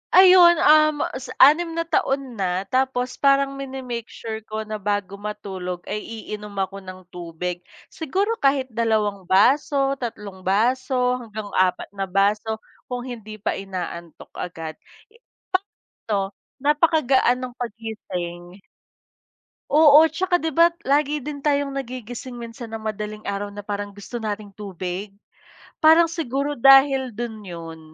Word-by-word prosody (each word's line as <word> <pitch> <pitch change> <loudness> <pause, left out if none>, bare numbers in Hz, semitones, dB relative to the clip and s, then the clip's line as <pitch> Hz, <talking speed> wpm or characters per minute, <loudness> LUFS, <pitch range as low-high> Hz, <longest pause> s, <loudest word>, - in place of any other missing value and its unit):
Ayon, 365 -2 +8
um, 305 -1 +5 0.2
sa 255 -1 -9 0.2
6 330 +1 -3
na 335 - 0
taon 270 -7 -1
na 185 0 0
tapos 255 -1 0
parang 275 0 +3
mini-make 260 -4 -5
sure 220 -1 -6
ko 215 0 -4
na 215 0 -5
bago 200 -1 -2
matulog 190 -4 -5
ay 210 - -4
iinom 210 -2 -8
ako 195 +1 -6
ng 185 -1 -11
tubig, 175 0 -5 0.3
siguro 395 +9 -1
kahit 275 -2 +1
dalawang 215 -4 0
baso, 275 +7 +3
tatlong 205 -6 -7
baso 250 +4 +1
hanggang 215 -3 -7
4 185 0 +1
na 195 -1 -4
baso 205 +3 +1 0.3
kung 245 -1 -4
hindi 225 -4 -8
pa 210 - -2
inaantok 175 -3 -7
agad. 165 -3 -7 1.1
Sakto 200 -2 -3 0.2
napakagaan 285 -3 +3
ng 255 -1 -6
paggising. 190 -7 -6 1.1
Oo 305 +1 +7
'tsaka 355 +3 0
'di 320 0 -2
ba 335 +1 +6 0.2
lagi 295 +1 +2
din 285 0 -7
tayong 285 -2 +1
nagigising 245 -1 -6
minsan 230 0 -8
ng 225 0 -5
madaling 215 0 -5
araw 200 0 -3
na 205 - -9
parang 205 0 -4
gusto 205 +4 -10
nating 210 -3 -5
tubig, 195 -1 -5 0.7
parang 320 +2 +7
siguro 290 -3 -2
dahil 270 0 +6
do'n 235 0 -5
yun. 165 -4 -8
230 Hz, 130 wpm, -23 LUFS, 200-275 Hz, 1.1 s, Ayon